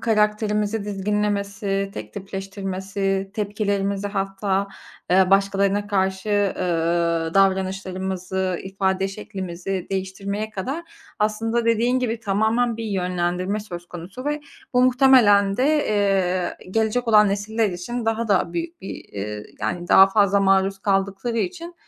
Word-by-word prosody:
karakterimizi 210 Hz, -1 st, +1 dB
dizginlemesi, 200 Hz, 0 st, -1 dB
tektipleştirmesi, 195 Hz, 0 st, -4 dB
tepkilerimizi 200 Hz, -1 st, -1 dB
hatta, 195 Hz, 0 st, -1 dB, 0.4 s
eee, 185 Hz, 0 st, +4 dB
başkalarına 200 Hz, +1 st, +2 dB
karşı, 190 Hz, 0 st, -1 dB
eee, 205 Hz, -2 st, +2 dB, 0.8 s
davranışlarımızı, 190 Hz, -1 st, 0 dB
ifade 190 Hz, 0 st, -1 dB
şeklimizi 190 Hz, -2 st, -5 dB
değiştirmeye 195 Hz, +2 st, -3 dB
kadar, 270 Hz, -, -4 dB, 0.3 s
aslında 225 Hz, +2 st, 0 dB
dediğin 230 Hz, +3 st, +2 dB
gibi 235 Hz, -2 st, -2 dB
tamamen 220 Hz, +3 st, +1 dB
bir 230 Hz, -, -5 dB
yönlendirme 180 Hz, 0 st, -1 dB
söz 175 Hz, -4 st, -8 dB
konusu 180 Hz, +10 st, -9 dB
ve 295 Hz, +1 st, -1 dB, 0.3 s
bu 250 Hz, -, +5 dB
muhtemelen 245 Hz, -7 st, +5 dB
de, 255 Hz, -, +2 dB, 0.2 s
eee, 195 Hz, -3 st, +1 dB
gelecek 225 Hz, +3 st, 0 dB
olan 210 Hz, -2 st, +6 dB
nesiller 205 Hz, +2 st, 0 dB
için 225 Hz, +7 st, -4 dB
daha 225 Hz, 0 st, 0 dB
da 195 Hz, -3 st, +2 dB
büyük 340 Hz, 0 st, -4 dB
bir, 195 Hz, -, -6 dB
eee, 105 Hz, +1 st, -6 dB, 0.2 s
yani 175 Hz, 0 st, -3 dB
daha 190 Hz, -, +8 dB
fazla 200 Hz, -1 st, +3 dB
maruz 195 Hz, 0 st, +3 dB
kaldıkları 195 Hz, +4 st, 0 dB
için, 345 Hz, +4 st, -4 dB
200 Hz, 115 wpm, -23 LUFS, 190-215 Hz, 0.8 s, daha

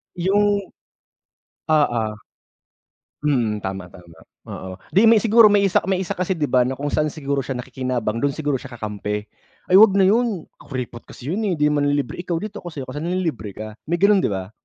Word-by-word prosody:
Yung 200 Hz, +3 st, +2 dB, 1.1 s
oo. 145 Hz, -7 st, +3 dB, 1.2 s
Mhm, 115 Hz, -8 st, 0 dB
tama, 95 Hz, -1 st, -4 dB
tama. 85 Hz, -2 st, -16 dB, 0.3 s
Oo, 95 Hz, 0 st, -7 dB, 0.2 s
'di 205 Hz, +5 st, +5 dB
may 230 Hz, -, +7 dB
siguro 225 Hz, +1 st, +6 dB
may 205 Hz, -1 st, +4 dB
isa 195 Hz, -2 st, +3 dB
may 190 Hz, -1 st, +1 dB
isa 175 Hz, -, -6 dB
kasi 185 Hz, +1 st, -1 dB
'di 160 Hz, -, -3 dB
ba 125 Hz, -3 st, +3 dB
na 130 Hz, -, -2 dB
kung 145 Hz, +2 st, -3 dB
saan 155 Hz, -, +1 dB
siguro 140 Hz, -2 st, -2 dB
siya 135 Hz, 0 st, -4 dB
nakikinabang 125 Hz, -3 st, -3 dB
dun 140 Hz, +2 st, 0 dB
siguro 145 Hz, -4 st, -1 dB
siya 130 Hz, -1 st, -10 dB
kakampi. 105 Hz, -1 st, -4 dB, 0.4 s
"Ay 185 Hz, +1 st, +5 dB
huwag 210 Hz, -2 st, +7 dB
na 195 Hz, -, +5 dB
yun 210 Hz, -2 st, +2 dB, 0.2 s
kuripot 125 Hz, -3 st, -6 dB
kasi 130 Hz, +5 st, -7 dB
yun, 195 Hz, -, -1 dB
eh, 180 Hz, -, 0 dB
di 150 Hz, 0 st, +2 dB
manlilibre 145 Hz, -1 st, 0 dB
ikaw 175 Hz, -1 st, -2 dB
dito 210 Hz, +4 st, -5 dB
ako -, -, -10 dB
sa'yo 155 Hz, -5 st, -6 dB
kasi 145 Hz, -, -5 dB
nanlilibre 165 Hz, -, -3 dB
ka." 110 Hz, -, -6 dB, 0.2 s
May 170 Hz, -, +1 dB
ganun 200 Hz, +3 st, +4 dB
'di -, -, +1 dB
ba? 95 Hz, 0 st, -4 dB
145 Hz, 195 wpm, -21 LUFS, 120-190 Hz, 1.2 s, may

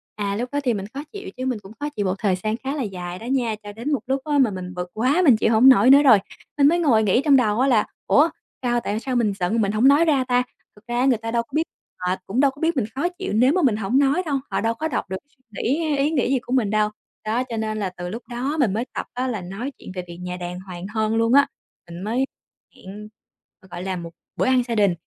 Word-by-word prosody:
À, 200 Hz, -1 st, -2 dB
lúc 245 Hz, +4 st, -3 dB
đó 285 Hz, -, 0 dB
thì 245 Hz, -3 st, +2 dB
mình 195 Hz, -2 st, -4 dB
khó 280 Hz, -, -4 dB
chịu 405 Hz, -1 st, -7 dB
chứ 255 Hz, -, -3 dB
mình 250 Hz, -5 st, -1 dB
cũng 195 Hz, +1 st, -14 dB
khó 295 Hz, -, -2 dB
chịu 210 Hz, -9 st, -3 dB
một 185 Hz, 0 st, 0 dB
thời 195 Hz, -3 st, +1 dB
gian 215 Hz, +1 st, -1 dB
khá 270 Hz, +3 st, -4 dB
là 285 Hz, -, -2 dB
dài 180 Hz, -3 st, -6 dB
đó 225 Hz, -, -9 dB
nha, 245 Hz, -3 st, 0 dB
cho 205 Hz, 0 st, -8 dB
đến 235 Hz, +8 st, -4 dB
một 275 Hz, -, +1 dB
lúc 265 Hz, +1 st, 0 dB
á 295 Hz, -1 st, 0 dB
mà 255 Hz, -6 st, +4 dB
mình 185 Hz, -1 st, -6 dB
bực 180 Hz, 0 st, -5 dB
quá 260 Hz, +11 st, +2 dB
mình 250 Hz, -7 st, +6 dB
chịu 220 Hz, -, +2 dB
hổng 245 Hz, +5 st, +7 dB
nổi 255 Hz, -1 st, +6 dB
nữa 280 Hz, +2 st, +8 dB
rồi, 245 Hz, -6 st, +8 dB, 0.4 s
mình 280 Hz, -1 st, +6 dB
mới 340 Hz, +4 st, +3 dB
ngồi 240 Hz, -10 st, +3 dB
nghĩ 210 Hz, +6 st, +3 dB
trong 285 Hz, -2 st, +6 dB
đầu 220 Hz, -3 st, +2 dB
á 265 Hz, -, +3 dB
là, 230 Hz, -6 st, +3 dB, 0.2 s
ủa, 305 Hz, +4 st, +5 dB, 0.3 s
sao 240 Hz, -1 st, +1 dB
tại 215 Hz, -2 st, -3 dB
sao 255 Hz, +1 st, -3 dB
mình 220 Hz, -4 st, +2 dB
giận 185 Hz, +6 st, +1 dB
mình 200 Hz, -1 st, +1 dB
hổng 220 Hz, +5 st, +3 dB
nói 290 Hz, +4 st, +6 dB
ra 285 Hz, -5 st, +3 dB
ta. 250 Hz, 0 st, +3 dB, 0.3 s
Thực 210 Hz, +3 st, -21 dB
ra 240 Hz, 0 st, -1 dB
á 255 Hz, -, +3 dB
người 260 Hz, -3 st, +3 dB
ta 225 Hz, +1 st, -5 dB
đâu 235 Hz, 0 st, +1 dB
có 235 Hz, -, -31 dB
biết, 315 Hz, -, +2 dB, 0.4 s
họ 180 Hz, +1 st, 0 dB
cũng 220 Hz, +6 st, -2 dB
đâu 275 Hz, 0 st, +4 dB
có 285 Hz, -, -16 dB
biết 330 Hz, +1 st, +1 dB
mình 240 Hz, -, +1 dB
khó 285 Hz, +6 st, 0 dB
chịu 355 Hz, -, -5 dB
nếu 250 Hz, +6 st, +4 dB
mà 370 Hz, -, +2 dB
mình 255 Hz, -9 st, +3 dB
hổng 220 Hz, +6 st, +1 dB
nói 285 Hz, +6 st, +2 dB
đâu, 285 Hz, -3 st, 0 dB
họ -, -, 0 dB
đâu 225 Hz, 0 st, +1 dB
có 310 Hz, +8 st, -3 dB
đọc 250 Hz, -, -3 dB
được 190 Hz, -, -3 dB
suy 260 Hz, -2 st, -37 dB
nghĩ 245 Hz, +8 st, -1 dB
hay 290 Hz, -, +1 dB
ý 280 Hz, +3 st, +1 dB
nghĩ 265 Hz, -7 st, +1 dB
gì 265 Hz, -, +2 dB
của 245 Hz, +1 st, -6 dB
mình 245 Hz, -6 st, +2 dB
đâu. 215 Hz, 0 st, +2 dB, 0.4 s
Đó, 230 Hz, +4 st, 0 dB
cho 235 Hz, -3 st, -6 dB
nên 215 Hz, -1 st, -2 dB
là 195 Hz, -3 st, -1 dB
từ 175 Hz, 0 st, -5 dB
lúc 230 Hz, +5 st, -6 dB
đó 255 Hz, +6 st, -2 dB
mình 225 Hz, -8 st, +2 dB
mới 225 Hz, +4 st, -1 dB
tập -, -, -3 dB
á 255 Hz, +1 st, -2 dB
là 220 Hz, -6 st, -3 dB
nói 195 Hz, +10 st, -5 dB
chuyện -, -, -10 dB
về 180 Hz, -, -4 dB
việc 170 Hz, 0 st, -9 dB
nhà 180 Hz, 0 st, -5 dB
đàng 180 Hz, 0 st, -6 dB
hoàng 185 Hz, -1 st, -8 dB
hơn 220 Hz, 0 st, 0 dB
luôn 230 Hz, +1 st, +2 dB
á, 280 Hz, +1 st, +6 dB, 0.4 s
mình 170 Hz, +1 st, -8 dB
mới 240 Hz, +6 st, 0 dB, 0.5 s
hẹn, 205 Hz, +3 st, -10 dB, 0.5 s
g 190 Hz, -, -19 dB
gọi 175 Hz, -, -6 dB
là, 190 Hz, 0 st, -2 dB
một 170 Hz, -2 st, -6 dB, 0.3 s
bữa -, -, 0 dB
ăn 255 Hz, -1 st, +3 dB
gia 235 Hz, -1 st, -3 dB
đình, 200 Hz, -4 st, +3 dB
235 Hz, 295 wpm, -22 LUFS, 205-270 Hz, 0.5 s, nữa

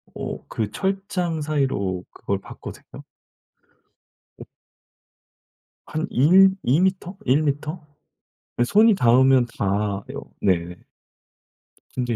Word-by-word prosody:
어 -, -, -6 dB
그 110 Hz, -2 st, -3 dB
철장 190 Hz, -, -2 dB
사이로 135 Hz, -12 st, -1 dB
그걸 100 Hz, -1 st, -3 dB
봤거든요. -, -, -11 dB, 1.4 s
어. -, -, -9 dB, 1.4 s
한 160 Hz, +2 st, -3 dB
1 190 Hz, +8 st, +5 dB
2 135 Hz, +7 st, +3 dB
미터 190 Hz, 0 st, -1 dB
1 140 Hz, +5 st, +3 dB
미터? 150 Hz, +3 st, -3 dB, 0.7 s
이 -, -, +5 dB
손이 215 Hz, -, +5 dB
닿으면 130 Hz, -2 st, +4 dB
닿아요. 100 Hz, 0 st, -3 dB
네. 90 Hz, -2 st, 0 dB, 1.2 s
근데 125 Hz, -2 st, -2 dB
135 Hz, 155 characters per minute, -23 LUFS, -, 1.4 s, 1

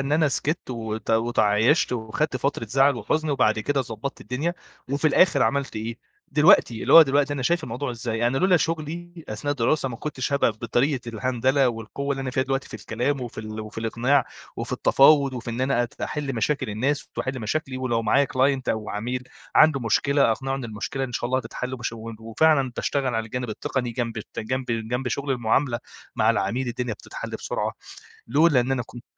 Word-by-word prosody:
إن 135 Hz, +2 st, -2 dB
أنا 155 Hz, 0 st, +4 dB
سكِتت 145 Hz, +2 st, -2 dB
وت 110 Hz, -2 st, -4 dB
وتعايشت 115 Hz, +4 st, +3 dB
وخدت 125 Hz, +5 st, -1 dB
فترة 135 Hz, -1 st, -1 dB
زعل 135 Hz, +4 st, +3 dB
وحزن 155 Hz, +8 st, -1 dB
وبعد 110 Hz, -6 st, +2 dB
كده 140 Hz, +5 st, 0 dB
ضبَّطت 120 Hz, +1 st, -5 dB
الدنيا، 155 Hz, +8 st, -2 dB, 0.4 s
وفي 140 Hz, +3 st, +1 dB
الآخر 155 Hz, -3 st, +4 dB
عملت 135 Hz, +2 st, 0 dB
إيه، 115 Hz, +2 st, -4 dB, 0.3 s
دلوقتي 150 Hz, -6 st, +5 dB
اللي -, -, +1 dB
هو 165 Hz, -, +12 dB
دلوقتي 145 Hz, 0 st, +1 dB
أنا 140 Hz, -2 st, -3 dB
شايف 170 Hz, +6 st, +1 dB
الموضوع 125 Hz, +3 st, -4 dB
إزاي؟ 115 Hz, -1 st, -2 dB
أنا 130 Hz, +3 st, +1 dB
لولا 185 Hz, +2 st, +4 dB
شُغلي 165 Hz, +1 st, -3 dB
أثناء 110 Hz, +7 st, -3 dB
الدراسة 135 Hz, +2 st, +1 dB
ما 120 Hz, -, -6 dB
كُنتش 140 Hz, 0 st, -4 dB
هابقى 140 Hz, -4 st, +3 dB
ف -, -, -23 dB
بطريقة 120 Hz, +3 st, 0 dB
الهندلة 130 Hz, +4 st, +1 dB
والقوة 120 Hz, +5 st, -5 dB
اللي 135 Hz, -, -4 dB
أنا 130 Hz, -1 st, -3 dB
فيها 130 Hz, +1 st, +1 dB
دلوقتي، 135 Hz, 0 st, -2 dB
في -, -, -10 dB
الكلام 120 Hz, +6 st, -2 dB
وفي 120 Hz, -2 st, -7 dB
ال 110 Hz, 0 st, -6 dB
وفي 110 Hz, +1 st, -8 dB
الإقناع، 120 Hz, +4 st, +2 dB, 0.3 s
وفي -, -, -4 dB
التفاوض 140 Hz, -1 st, +5 dB
وفي 120 Hz, -1 st, -5 dB
إن 115 Hz, -, -4 dB
أنا 130 Hz, -2 st, +2 dB
أت 120 Hz, -, -7 dB
أحل 145 Hz, -3 st, -3 dB
مشاكل 125 Hz, +2 st, -1 dB
الناس، 130 Hz, +8 st, -1 dB
ت -, -, -14 dB
وأحل 130 Hz, 0 st, -2 dB
مشاكلي، 130 Hz, +4 st, -2 dB
ولو 125 Hz, -3 st, -1 dB
معايا 140 Hz, +6 st, +3 dB
client 135 Hz, +1 st, +2 dB
أو 110 Hz, -1 st, -1 dB
عميل، 125 Hz, +5 st, -3 dB, 0.3 s
عنده 155 Hz, -3 st, +6 dB
مشكلة 140 Hz, +3 st, +2 dB
أقنعه 135 Hz, +3 st, -3 dB
إن 135 Hz, -2 st, -4 dB
المشكلة 115 Hz, +4 st, -4 dB
إن 125 Hz, -, -7 dB
شاء 120 Hz, -, -2 dB
الله 130 Hz, +1 st, +2 dB
هتتحل، 125 Hz, +1 st, -5 dB
وباش 120 Hz, -2 st, -4 dB
و 115 Hz, 0 st, -7 dB
وفعلًا 135 Hz, +4 st, +2 dB
باشتغل 135 Hz, -4 st, -1 dB
على 115 Hz, 0 st, 0 dB
الجانب 125 Hz, +2 st, -4 dB
التقني 125 Hz, +3 st, -2 dB
جنب 115 Hz, -1 st, -3 dB
ت -, -, -9 dB
جنب 130 Hz, +4 st, -2 dB, 0.2 s
جنب 125 Hz, +2 st, -1 dB
شُغل 140 Hz, +3 st, -3 dB
المعاملة، 120 Hz, 0 st, +1 dB, 0.4 s
مع 110 Hz, -1 st, +4 dB
العميل 115 Hz, +4 st, -1 dB
الدنيا 120 Hz, -1 st, -3 dB
بتتحل -, -, -8 dB
بسرعة، -, -, -3 dB, 0.6 s
لولا 145 Hz, +2 st, +4 dB
إن 125 Hz, +2 st, 0 dB
أنا 130 Hz, -2 st, 0 dB
كنت 120 Hz, 0 st, -11 dB
130 Hz, 195 wpm, -24 LUFS, 115-140 Hz, 0.6 s, هو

